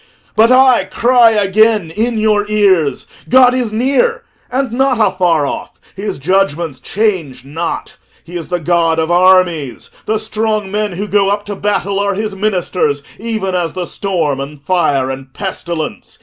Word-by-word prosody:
But 220 +2 +5
I 255 -1 +5
cry 240 -1 +4
again 210 -3 +2
in 225 +5 -1
your 210 -1 +1
ears: 190 -8 +2 0.2
God 250 -1 +6
is 250 -4 -1
near 280 - +1 0.3
and 260 -1 -1
not 260 +1 +1
afar 180 -7 +2
off; - - -6 0.2
his 200 +3 -4
judgments 170 -2 0
change 175 - -2
not. 165 +4 -5 0.3
He 175 - -11
is 170 -2 -5
the 180 0 -2
God 165 0 +1
of 160 +1 0
armies; 175 -6 +2 0.2
the 220 - +1
strong 215 -2 -1
men 210 -1 -1
who 195 +4 -4
go 200 -1 +2
up 205 +1 -1
to 205 - -5
battle 200 0 -1
are 200 -1 0
his 210 0 -3
ministers, 180 -7 -1 0.2
even 215 -4 -3
as 175 -2 -1
the 185 -1 -4
storm, 170 -8 -2
and 140 +2 -7
fire, 140 -5 0
and 135 0 -8
pestilence. 170 -5 -5
195 Hz, 160 wpm, -15 LUFS, 170-215 Hz, 0.3 s, God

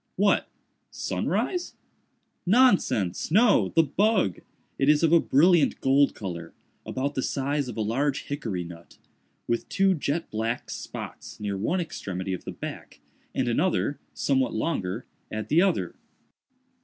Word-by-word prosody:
"What?—sunrise?" 360 -1 -1 0.7
"Nonsense! 175 - +3
no!—the 165 - +4
bug. 190 - +1 0.4
It 135 - +3
is 150 +1 +4
of 165 0 +4
a 170 - +8
brilliant 165 +2 +4
gold 135 +1 +3
color—about 95 - -6
the 130 - -1
size 140 +1 -1
of 125 - -7
a - - 0
large 135 +6 0
hickory 115 -11 -3
nut—with 85 +6 -8
two 195 0 +3
jet 160 +1 -2
black 115 +2 -2
spots - - -8
near 105 -2 -2
one 115 - 0
extremity 95 - -4
of 90 - -6
the - - -4
back, - - -8 0.4
and 130 - 0
another, 145 +3 +1
somewhat 135 -2 0
longer, 105 - -2 0.2
at 110 0 -5
the 160 +4 +5
other. 195 0 +1
135 Hz, 125 wpm, -26 LUFS, 110-165 Hz, 0.7 s, a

